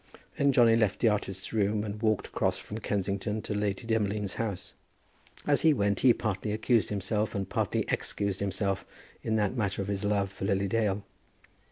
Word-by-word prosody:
Then 140 0 +3
Johnny 120 -3 +5
left 105 -4 +1
the 115 - +4
artist's 95 -2 -3
room 105 -1 +1
and 105 0 -5
walked 110 -3 +1
across - - 0
from 110 - -7
Kensington 100 +1 -1
to - - -3
Lady 105 +1 -1
Demolines' 105 -3 -1
house. 105 -5 -4 0.7
As 145 -1 +3
he 160 -2 +5
went 100 -3 +1
he 130 - +6
partly 105 -2 -1
accused 110 +1 +2
himself, 105 +2 -1
and 100 -2 -2
partly - - 0
excused 100 -2 -1
himself 100 0 -1 0.4
in 110 - -1
that 105 +2 +1
matter 100 -5 -1
of 100 0 -2
his 100 0 -2
love 100 -1 +1
for 95 - -5
Lily 100 0 +1
Dale. 105 -1 0
105 Hz, 180 wpm, -29 LUFS, 100-110 Hz, 0.7 s, he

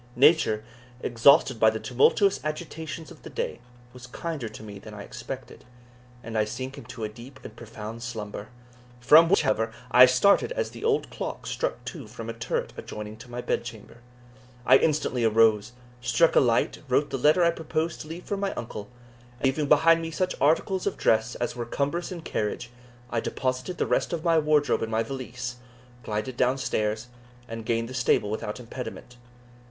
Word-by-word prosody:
Nature, 135 -6 +4 0.4
exhausted 130 +1 +4
by 110 - +6
the 110 0 -3
tumultuous 130 - +3
agitations 160 +1 -5
of 160 - -14
the - - -9
day, - - -3 0.3
was 125 -1 -11
kinder 145 -2 -5
to - - -11
me 100 -2 -9
than 105 +1 -11
I 100 - -7
expected, 120 +3 -8 0.6
and 115 -1 -7
I 110 - +3
sank 130 +5 -5
into 115 - -8
a - - 0
deep 120 +5 -12
and 110 - -10
profound 115 0 -8
slumber, 110 -4 -6 0.5
from 160 +7 +7
which, 195 -3 +4
however, 115 -5 +1 0.2
I 125 +1 +9
started 200 - +4
as - - -2
the - - -10
old 445 -1 +1
clock - - -5
struck - - -3
two - - -7
from - - -7
a - - -7
turret 485 0 -3
adjoining 105 0 -7
to 120 +2 -13
my 120 0 -5
bedchamber. 115 -2 -4 0.7
I 130 +2 +7
instantly 145 -6 +1
arose, 110 0 +4 0.3
struck 165 +6 +3
a - - +8
light, 120 -3 +1
wrote 145 +3 +2
the 135 - -2
letter 155 +7 +4
I 170 - +5
proposed 160 0 -3
to - - -9
leave 165 +3 -7
for 200 - -2
my 195 0 -1
uncle, 105 -3 -6 0.5
and 125 - -3
leaving 140 +2 +1
behind 165 +3 +5
me 165 - -4
such 185 +3 -1
articles 180 +6 +2
of 200 - -2
dress 110 +2 +2
as 120 - -3
were 120 - -3
cumbrous 145 +9 -2
in 175 -2 -6
carriage, 120 +1 -3 0.4
I 115 - +1
deposited 130 +8 -2
the - - +1
rest - - 0
of 165 -2 -3
my 165 -2 +4
wardrobe 150 -1 +2
in 115 - -2
my 110 0 +1
valise, 125 0 -6 0.4
glided 110 +3 -4
down 125 +1 +2
stairs, 110 -3 -1 0.4
and 115 -1 -7
gained 115 0 0
the 130 - -8
stable 125 -4 +2
without 110 +1 -4
impediment. 125 0 -8
125 Hz, 185 wpm, -26 LUFS, 115-155 Hz, 0.7 s, I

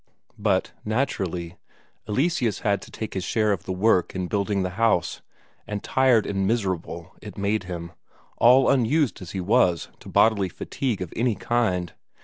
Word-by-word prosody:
But, - - +1
naturally, 95 -7 -2 0.5
Eleseus 125 - 0
had 100 -1 +1
to - - -12
take 110 - -6
his 95 - -3
share 110 +1 +1
of 95 -5 -2
the - - -4
work 95 -1 +2
in 95 -1 -2
building 100 +1 0
the 90 - -2
house; 105 -3 +1 0.5
and 105 -1 -4
tired 130 -4 +3
and 95 -1 -1
miserable 95 -6 -2
it - - -10
made 100 0 0
him, 85 -2 -6 0.5
all 125 +3 +6
unused 130 - +2
as 95 0 -8
he 95 - -3
was 90 -4 +2
to - - -12
bodily 100 -4 +3
fatigue 120 - -3
of 85 - -9
any 115 -1 +1
kind. 95 -6 0
100 Hz, 160 wpm, -24 LUFS, 90-115 Hz, 0.5 s, all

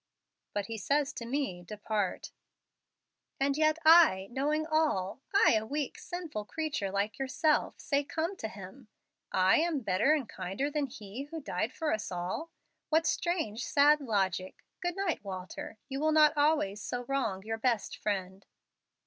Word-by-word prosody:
'" - - -56
"But 205 -1 0
He 225 +1 -5
says 285 +6 +1
to 235 - -6
me, 260 -9 -2
'Depart.'" 205 +1 -3 1.1
"And 275 0 +2
yet 310 +1 +3
I, 315 - +7
knowing 300 +5 0
all 300 - 0
I, 400 - +5
a 220 -1 +2
weak, 285 +5 -3
sinful 330 -12 -5
creature 295 -6 -2
like 205 +4 -2
yourself 295 +3 +1
say, 280 0 0
Come 325 +6 -2
to 220 - -4
Him. 215 +4 -11 0.4
I 185 0 +4
am 320 -3 +1
better 215 +7 +3
and 275 -7 -3
kinder 195 +11 -3
than 290 -1 0
He 235 0 -8
who 325 +2 -6
died 220 - -2
for 315 +3 -1
us 215 -2 -3
all! 180 - -3 0.4
What 320 +1 +3
strange, 320 - -1
sad 295 +1 +4
logic! 190 -6 -1 0.2
Good 350 -1 -1
night, 390 - -1
Walter. 190 +2 -7
You 270 0 -4
will 310 +1 +2
not 305 0 +5
always 290 -9 +2
so 245 +3 -3
wrong 240 -8 -1
your 225 +1 -4
best 235 -3 0
Friend." 190 -2 -3
265 Hz, 160 wpm, -31 LUFS, 200-305 Hz, 1.1 s, I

